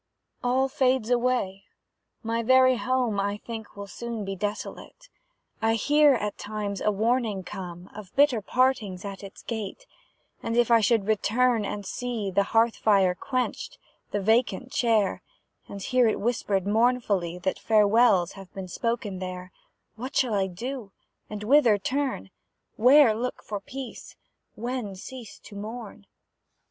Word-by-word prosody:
All 255 +2 +2
fades 255 -3 +1
away; 240 -6 0 0.6
my 230 +1 -1
very 255 +1 +5
home 250 -5 0
I 200 +1 -1
think 220 -2 -8
will 200 - -6
soon 230 +1 -6
be 195 0 -4
desolate; 210 - -6 0.5
I 225 +1 +2
hear, 290 +4 +4
at 210 -3 -3
times, 205 -2 -4
a - - +2
warning 220 -1 0
come 180 -2 -8
Of 210 -4 -11
bitter 275 -5 +4
partings 220 -6 0
at 200 0 -7
its 195 +1 -11
gate; 225 - -5 0.6
And, 230 +1 -2
if 240 -1 +3
I 230 - +7
should 225 -2 +2
return 220 +2 +2
and 205 0 -5
see 230 -5 -3
The 200 +2 +2
hearth 225 +1 +3
fire 195 -4 +3
quenched, 255 +7 -3 0.3
the 205 - -1
vacant 240 +5 +1
chair; 220 -5 +1 0.5
And 200 -1 -7
hear 250 +1 +3
it 220 - 0
whispered 205 -4 0
mournfully, 210 -5 +1
That 185 +1 -2
farewells 210 -4 +4
have 195 -2 -12
been 190 -2 -6
spoken 220 -2 -2
there, 185 0 -6 0.5
What 255 +4 -6
shall 250 -4 +2
I 195 -2 +1
do, 225 +3 -6 0.4
and 210 0 -6
whither 240 -3 +5
turn? 260 - -2 0.4
Where 255 0 +6
look 245 +3 -4
for 205 -1 -4
peace? 265 +4 -9 0.4
When 235 -3 -4
cease 235 +3 -10
to 205 - -13
mourn? 215 -1 -8
220 Hz, 145 wpm, -26 LUFS, 200-245 Hz, 0.6 s, I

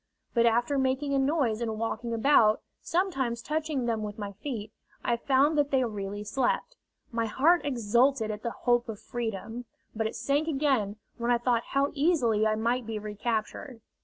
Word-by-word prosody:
But 235 -1 +4
after 240 +5 +2
making 265 +2 0
a 275 - +3
noise 270 -6 +1
and 220 -2 -2
walking 230 +1 -3
about, 225 -2 +4 0.2
sometimes 275 -10 0
touching 305 -4 -1
them 225 -2 0
with 210 -1 -5
my 205 -2 -5
feet, 215 0 -6 0.3
I 240 - +2
found 275 +5 +2
that 285 -1 +2
they 265 -2 +2
really 205 -2 -4
slept. 260 - -1 0.4
My 230 -1 -1
heart 320 +11 +3
exulted 240 -2 +2
at 210 0 -6
the 235 - -2
hope 240 0 0
of 215 -2 -5
freedom, 230 0 -5 0.3
but 220 0 0
it - - -6
sank 290 +3 0
again 270 -9 +1 0.2
when 235 +1 -1
I 240 - +4
thought 235 -1 +1
how 280 +1 +2
easily 265 -9 +2
I 215 - +1
might 235 +2 0
be 225 -1 -3
recaptured. 215 +4 -3
235 Hz, 175 wpm, -28 LUFS, 220-275 Hz, 0.4 s, But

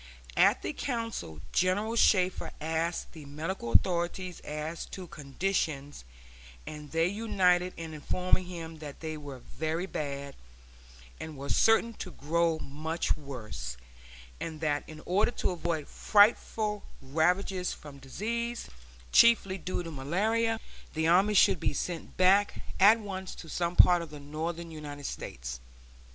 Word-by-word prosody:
At - - +4
the 100 - -2
council 230 - -4
General 205 +5 +1
Shafter 185 -5 +3
asked 160 +2 -2
the 160 -3 -11
medical 150 -2 -4
authorities 180 +2 +1
as 150 +2 -5
to 185 - -7
conditions, 145 - -2 0.6
and 150 -1 -8
they 165 +2 +2
united 185 -3 +2
in 165 -1 -6
informing 180 +4 0
him 165 -3 -7
that 145 -2 -9
they 160 -1 -4
were 145 -3 -8 0.2
very 160 +3 0
bad, 140 -5 -4 0.9
and 160 -2 -7
were 140 +1 -6
certain 225 +1 +4
to 185 - -5
grow 165 +2 +1
much 155 +3 -2
worse; 115 - -7 0.6
and 160 -2 -5
that 150 -2 0
in 155 -1 -10
order 200 +6 +3
to 240 - -1
avoid 165 -4 -2
frightful 210 0 +3 0.2
ravages 180 +6 +1
from 145 -2 -10
disease, 230 - -3 0.4
chiefly 195 -5 +5
due 180 +1 -3
to 165 - -6
malaria, 220 +11 0 0.4
the 160 +1 +1
army 195 +5 +4
should 185 - +6
be - - 0
sent 170 +3 -4
back 195 +3 +4 0.2
at 210 +4 +8
once 190 -3 -6
to 165 - -10
some 170 +2 -1
part 175 -1 +7
of 165 - -7
the 150 -1 -9
northern 165 +3 -4
United 145 -2 -7
States. 60 - -5
170 Hz, 140 wpm, -30 LUFS, 150-190 Hz, 0.9 s, at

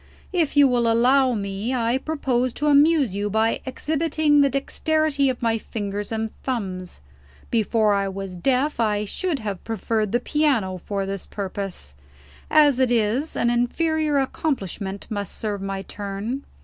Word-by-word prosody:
If 325 -5 +1
you 285 -1 +8
will 240 -2 +2
allow 255 +2 +4
me, 200 +4 -2
I 240 +1 +1
propose 255 -5 -1
to 295 - -2
amuse 290 - +4
you 205 +1 -1
by 220 +2 +1
exhibiting 300 +1 +1
the 280 - +4
dexterity 285 +1 +1
of 250 -2 -4
my 225 -1 +1
fingers 205 -1 -5
and 220 0 -2
thumbs. 185 - -4 0.5
Before 220 -2 +2
I 200 -1 +1
was 195 -1 -5
deaf, 260 - 0
I 210 -2 +1
should 345 - -2
have 205 -6 -5
preferred 220 -1 -1
the 240 - +2
piano 245 -10 +1
for 200 +1 -3
this 195 -1 -5
purpose. 195 - -5 0.6
As 290 -4 +5
it 255 -2 +3
is, 240 +6 +1
an 235 - +2
inferior 305 +5 +1
accomplishment 205 - -2
must 205 -3 -3
serve 205 -3 -3
my 195 0 -4
turn." 205 +7 -5
230 Hz, 150 wpm, -23 LUFS, 200-280 Hz, 0.6 s, you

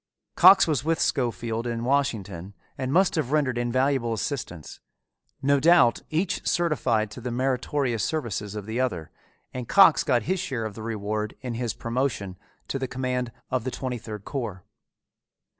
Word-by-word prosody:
Cox 190 +2 +8
was 150 -6 0
with 160 +1 0
Schofield 115 -2 -1
in 115 -1 -3
Washington 100 -9 -1 0.2
and 130 0 -3
must 180 +3 +4
have 155 -6 -1
rendered 140 -5 +1
invaluable 125 0 +1
assistance. 110 - -5 0.6
No 140 +1 +3
doubt 150 -6 +5
each 165 +4 -1
certified 130 -11 +1
to 120 - -9
the 125 - -4
meritorious 125 -1 -1
services 110 -9 -3
of 105 -2 -5
the 110 +3 -3
other 90 -12 -2 0.4
and 125 -2 -6
Cox 195 -6 +6
got 120 -3 +2
his 185 - -1
share 125 -9 -3
of 110 - -5
the 110 - -9
reward 105 -1 -3
in 125 -2 -4
his 115 -1 -3
promotion 115 -6 -2 0.3
to 135 - -3
the 130 - -2
command 125 -1 -2 0.2
of 130 -3 0
the 130 - -2
twenty 130 -1 -4
third 105 -2 -8
corps. 110 -10 -4
125 Hz, 160 wpm, -25 LUFS, 110-140 Hz, 0.6 s, Cox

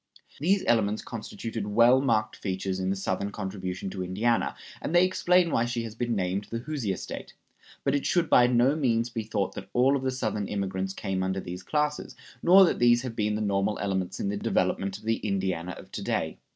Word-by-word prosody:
These 190 +7 +2
elements 110 -2 +2
constituted 110 -1 -5
well 120 +5 +5
marked 110 -5 +1
features 95 -1 -3
in 95 0 -1
the 95 - +1
Southern 95 +1 -2
contribution 95 -2 -5
to 95 -1 -4
Indiana, 110 +6 0 0.3
and 165 - -2
they 175 +1 +7
explain 180 -2 +3
why 115 - +2
she 120 -1 -2
has 115 -2 -6
been 120 0 -2
named 95 +1 -1
the 115 - -5
Hoosier 120 -6 -3
State; - - -8 0.5
but 135 - +1
it 145 - 0
should 175 -2 +2
by 120 -4 +6
no 125 +3 +3
means 120 -5 +1
be 115 - -2
thought 105 -3 -2
that - - -8
all 130 +3 +4
of 135 - -1
the 130 - 0
Southern 110 -6 -2
immigrants 95 -1 -2
came 95 -1 -3
under 95 +1 -1
these 90 -1 -6
classes, 150 0 -1 0.3
nor 190 +3 +8
that - - 0
these 120 0 +4
have 125 -3 -5
been 105 -1 0
the 105 - -2
normal 100 0 0
elements 95 -3 -2
in 100 - -1
the 100 - -2
development 100 -1 0
of 105 - -18
the 115 +1 +1
Indiana 95 -3 -2
of - - -13
to - - -5
day. - - -2
110 Hz, 210 wpm, -27 LUFS, 95-125 Hz, 0.5 s, nor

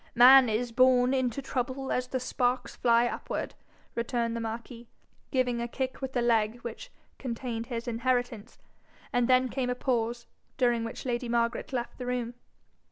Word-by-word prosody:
'Man 255 +1 +8
is 230 +2 -1
born 255 +1 +4
unto 260 0 0
trouble 265 +1 -3
as 250 0 0
the 260 - -2
sparks 250 0 -1
fly 235 0 +3
upward,' 240 - -4 0.4
returned 235 0 -1
the - - -2
marquis, 230 +1 -6 0.4
giving 250 -3 0
a 235 - -2
kick 260 +2 -4
with 265 0 -4
the 245 - +1
leg 225 -1 +2
which 240 - -8 0.3
contained 235 -2 -4
his 235 -2 -5
inheritance; 240 -2 -1 0.6
and 245 -1 +2
then 255 0 +4
came 255 0 -2
a 250 - 0
pause, 235 -2 -1 0.3
during 240 -2 +2
which 230 +3 -6
lady 240 -1 -2
Margaret 235 +1 0
left 245 -1 -4
the 250 - -5
room. 245 -1 -2
245 Hz, 165 wpm, -29 LUFS, 235-255 Hz, 0.6 s, Man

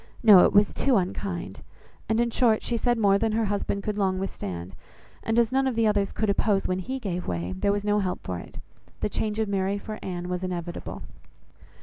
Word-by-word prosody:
No, 205 -5 +9
it - - +3
was 205 0 +4
too 270 -2 +2
unkind. 185 -1 -3 0.5
And 220 +1 +2
in 235 0 +1
short, 225 -2 +3
she 240 - -1
said 240 +1 +1
more 200 -2 +4
than 225 0 0
her 225 0 +1
husband 200 0 -2
could 210 -1 -2
long 190 -2 +1
withstand, 95 - -5 0.5
and 225 +1 -1
as 235 -1 +3
none 265 0 +2
of 255 - -1
the 230 0 +2
others 205 -2 +1
could 215 - -1
oppose 200 0 +1
when 185 0 -1
he 260 +8 -4
gave 185 -8 -4
way, 85 +1 -3
there 145 - +1
was 205 0 -2
no 210 0 +2
help 185 -2 -2
for 90 -1 -4
it; - - -12 0.4
the - - 0
change 215 0 -2
of 220 - +1
Mary 195 0 0
for 215 +1 -7
Anne 180 -1 -5
was 180 0 -3
inevitable. 175 -2 -5
200 Hz, 220 wpm, -26 LUFS, 185-220 Hz, 0.5 s, No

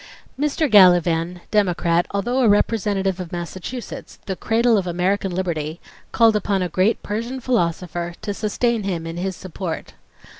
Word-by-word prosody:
Mr. 300 +2 +1
Gallivan, 175 - +5
Democrat, 175 -4 +2
although 240 +6 -1
a 240 -4 +4
representative 205 -3 +1
of 180 -3 -6
Massachusetts, 185 +8 -6
"the 190 - -3
cradle 230 +4 +2
of 190 -3 0
American 185 +3 0
liberty," 170 -3 -3 0.3
called 225 -2 +4
upon 200 -2 0
a 180 - -2
great 185 +7 +1
Persian 230 +5 -3
philosopher 175 -7 -1
to 205 -1 -2
sustain 225 +3 0
him 180 -5 -3
in 165 +1 -6
his 190 +1 -2
support. 180 -2 -6
190 Hz, 145 wpm, -21 LUFS, 175-220 Hz, 0.3 s, Gallivan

